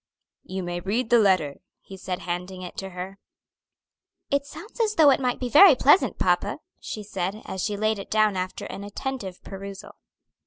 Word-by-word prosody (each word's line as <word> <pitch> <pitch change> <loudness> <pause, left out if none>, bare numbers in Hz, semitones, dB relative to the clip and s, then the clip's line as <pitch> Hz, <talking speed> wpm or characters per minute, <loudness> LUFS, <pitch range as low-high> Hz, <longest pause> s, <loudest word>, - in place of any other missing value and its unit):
"You 190 0 -5
may 175 0 -3
read 220 +6 -2
the 240 - +7
letter," 185 -9 +2 0.2
he 195 - -12
said, 190 -1 -5
handing 180 +1 -5
it 180 - -8
to 195 - -5
her. 185 +2 -7 1.1
"It 280 0 +1
sounds 430 +10 -11
as 430 -1 +1
though 305 -5 +7
it - - +3
might 250 -2 -1
be 250 - -2
very 305 +5 +8
pleasant, 290 +8 +4
papa," - - +1 0.2
she 215 - -6
said, 195 +1 -4
as 190 - -4
she 205 -1 -1
laid 215 0 0
it 195 - -8
down 215 -2 +3
after 185 0 -4
an 200 - -7
attentive 205 -2 -5
perusal. 195 0 -8
200 Hz, 185 wpm, -25 LUFS, 185-245 Hz, 1.1 s, very